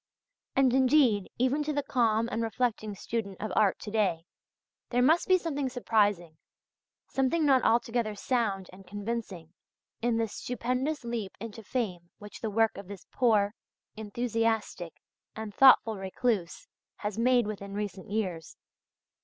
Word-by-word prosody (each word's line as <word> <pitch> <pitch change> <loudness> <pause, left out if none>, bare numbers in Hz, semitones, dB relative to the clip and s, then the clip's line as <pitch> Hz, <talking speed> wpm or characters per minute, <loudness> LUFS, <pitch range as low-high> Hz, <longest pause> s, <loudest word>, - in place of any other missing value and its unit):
And, 265 -2 +4
indeed, 255 -6 +4
even 260 +4 +1
to 305 - -2
the 290 0 -1
calm 230 -3 +1
and 225 - -1
reflecting 225 -2 -1
student 200 -2 -4
of 215 - -4
art 205 -3 +3
to 210 - -6
day, 190 -7 0 0.6
there 245 - +1
must 320 +6 +4
be 370 - +6
something 290 -6 -2
surprising, 205 -9 +1 0.7
something 270 +4 +1
not 265 -3 +5
altogether 230 -2 +1
sound 205 -5 -1
and 190 0 -14
convincing, 205 -4 -5 0.5
in 235 0 +1
this 225 -2 -1
stupendous 250 +5 -2
leap 230 -5 -4
into 225 +1 -7
fame 195 -7 -3
which 210 0 -11
the 220 - -2
work 225 +1 +2
of 200 - -10
this 200 -3 -10
poor, 215 -5 +2 0.4
enthusiastic, 220 -5 -2 0.4
and 220 -2 -6
thoughtful 230 -4 +6
recluse, 195 - -2 0.3
has 210 +1 -4
made 245 0 +4
within 200 -1 -6
recent 200 -3 -5
years. 185 -7 -3
225 Hz, 140 wpm, -29 LUFS, 200-250 Hz, 0.7 s, be